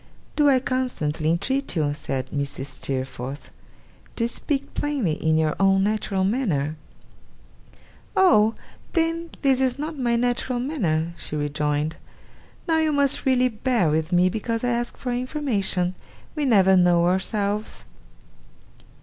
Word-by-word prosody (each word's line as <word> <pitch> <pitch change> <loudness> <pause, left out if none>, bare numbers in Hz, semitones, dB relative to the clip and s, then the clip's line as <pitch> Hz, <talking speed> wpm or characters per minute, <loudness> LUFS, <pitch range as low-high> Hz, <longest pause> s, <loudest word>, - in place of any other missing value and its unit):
'Do 295 -1 +4
I 265 -2 +5
constantly 245 - -1
entreat 265 +12 0
you,' 150 -3 +1
said 135 -3 -4
Mrs. 140 -2 -3
Steerforth, 135 0 -5 0.6
'to 230 - 0
speak 280 +3 -3
plainly, 285 - -1
in 160 +1 +1
your 155 -1 +1
own 195 0 +4
natural 205 -2 0
manner?' 185 - 0 1.4
'Oh! 225 - +5 0.4
then 330 0 0
this 265 -2 +3
is 260 -1 +1
not 305 0 -5
my 240 -2 +1
natural 245 +1 0
manner?' 170 - -1
she - - -6
rejoined. 150 +1 -1 0.7
'Now 325 -1 +3
you 315 -1 +2
must 280 -1 +1
really 255 -1 +4
bear 225 - +1
with 160 +2 0
me, 180 +1 +4
because 225 +4 -2
I 245 - +1
ask 240 0 -2
for 250 -2 -3
information. 240 - -1 0.4
We 300 - -1
never 195 -6 +5
know 175 -1 +4
ourselves. 200 +3 -1
210 Hz, 130 wpm, -24 LUFS, 160-260 Hz, 1.4 s, I